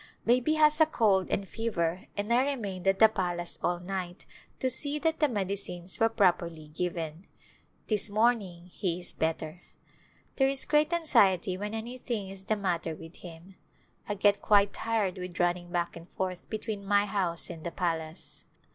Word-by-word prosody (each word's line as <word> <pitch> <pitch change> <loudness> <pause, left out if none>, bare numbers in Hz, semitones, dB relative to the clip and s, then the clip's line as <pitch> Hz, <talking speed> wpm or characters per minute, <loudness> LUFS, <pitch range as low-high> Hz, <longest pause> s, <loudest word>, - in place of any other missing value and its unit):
Baby 250 +6 +3
has 305 0 +5
a 315 - +7
cold 205 - +2
and 195 - -1
fever 185 -6 -2
and 205 +3 0
I 250 +2 +5
remained 205 -10 -3
at 195 0 +4
the 220 - +8
palace 175 -4 -2
all 175 0 0
night 180 -1 -5 0.3
to 260 - +1
see 285 +3 0
that 320 +1 0
the 300 - +4
medicines 190 -4 -3
were 225 - +4
properly 170 -7 +1
given; 165 +1 -4 0.6
this 210 -1 +1
morning 205 -5 +1
he 180 -1 -2
is 180 - -3
better. 160 +1 -2 0.8
There 270 -1 +4
is 275 0 +1
great 300 +1 +3
anxiety 195 - +3
when 210 +3 -4
anything 230 -3 -4
is 195 0 -10
the 215 - +1
matter 175 -5 -1
with 165 +2 -12
him. 175 +2 -12 0.5
I 205 - 0
get 200 0 +3
quite 205 -1 +4
tired 215 -5 -1
with 180 -1 -7
running 175 0 +1
back 175 -1 -1
and 170 +1 -11
forth 185 -1 -4
between 215 -2 -4
my 205 +1 +3
house 185 -5 -2
and 160 - -9
the 170 - -2
palace. 165 -2 -4
195 Hz, 170 wpm, -29 LUFS, 175-225 Hz, 0.8 s, the